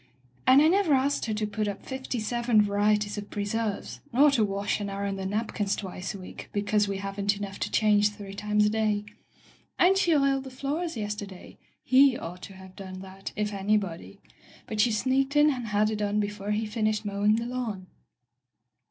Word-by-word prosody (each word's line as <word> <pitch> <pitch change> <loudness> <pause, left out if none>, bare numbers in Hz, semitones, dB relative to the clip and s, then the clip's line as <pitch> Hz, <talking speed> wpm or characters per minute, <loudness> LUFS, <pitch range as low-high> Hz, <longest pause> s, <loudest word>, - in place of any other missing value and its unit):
And 265 +3 +7
I - - +6
never 355 -4 +4
asked 270 -1 0
her 220 - -1
to 215 0 -1
put 210 0 -2
up 200 -1 -5
fifty 260 -2 -4
seven 235 0 +2
varieties 205 0 +1
of 205 - -9
preserves, 210 +1 -3
nor 280 +4 +5
to 240 -6 +2
wash 200 0 -1
and 205 -1 -3
iron 200 0 -3
the 190 -1 -4
napkins 205 -1 -1
twice 190 0 -5
a - - -8
week, 185 - -10
because 205 0 +1
we 200 -1 -2
haven't 200 +1 -1
enough 200 -1 -6
to - - -2
change 210 -1 +4
three 205 -2 -9
times 210 +1 +1
a - - +3
day. 215 -1 0 0.7
And 370 +2 +5
she 350 -4 +3
oiled 275 -1 +2
the - - -6
floors 285 +5 -3
yester 210 -1 -4
day. 190 -2 -13 0.2
He 260 -1 +5
ought 175 +2 -7
to 195 - -9
have 190 0 -13
done 185 -1 -8
that, 190 0 -8
if 210 0 -2
any 200 +2 +2
body. 195 0 -6 0.5
But 215 -1 0
she 235 - +3
sneaked 265 +5 +1
in 295 +1 +6
and 250 -4 -4
had 210 +1 +2
it 215 - -2
done 210 0 0
before 205 -1 -3
he 210 +1 0
finished 215 0 -1
mowing 205 +1 +2
the 230 +1 -2
lawn." 235 -6 -4
210 Hz, 200 wpm, -27 LUFS, 200-240 Hz, 0.7 s, And